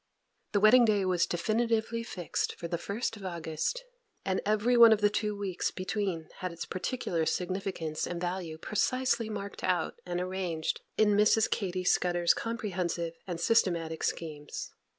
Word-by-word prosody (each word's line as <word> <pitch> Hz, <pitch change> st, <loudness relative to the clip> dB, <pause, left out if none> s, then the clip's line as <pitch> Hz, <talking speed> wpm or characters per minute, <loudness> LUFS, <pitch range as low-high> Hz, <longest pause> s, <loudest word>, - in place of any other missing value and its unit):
The 205 Hz, -, +4 dB
wedding 225 Hz, +4 st, +7 dB
day 210 Hz, -4 st, +3 dB
was 180 Hz, -2 st, +2 dB
definitively 225 Hz, +4 st, 0 dB
fixed 185 Hz, -7 st, -3 dB
for 170 Hz, -, -5 dB
the 170 Hz, 0 st, -2 dB
1st 220 Hz, +5 st, -3 dB
of 205 Hz, -, -11 dB
August, 170 Hz, -, -3 dB, 0.4 s
and 190 Hz, -1 st, 0 dB
every 215 Hz, +4 st, +3 dB
one 235 Hz, -1 st, +9 dB
of 220 Hz, -, +5 dB
the 205 Hz, -1 st, +3 dB
two 210 Hz, -1 st, -1 dB
weeks 195 Hz, -3 st, -2 dB
between 185 Hz, -3 st, -3 dB
had 185 Hz, -2 st, -3 dB
its 170 Hz, -, -6 dB
particular 185 Hz, -4 st, -2 dB
significance 180 Hz, -4 st, -2 dB
and 175 Hz, -1 st, -4 dB
value 175 Hz, -2 st, -3 dB
precisely 235 Hz, +5 st, 0 dB
marked 200 Hz, -2 st, -6 dB
out 175 Hz, -3 st, 0 dB
and 175 Hz, 0 st, -3 dB
arranged 180 Hz, -3 st, -2 dB, 0.2 s
in 215 Hz, -1 st, +5 dB
Mrs. 210 Hz, +2 st, +4 dB
Katy 185 Hz, -3 st, -1 dB
Scudder's 175 Hz, -1 st, +3 dB
comprehensive 180 Hz, -7 st, -2 dB
and 175 Hz, -2 st, -4 dB
systematic 170 Hz, -6 st, +1 dB
schemes. 150 Hz, -3 st, -4 dB
190 Hz, 150 wpm, -30 LUFS, 175-215 Hz, 0.4 s, one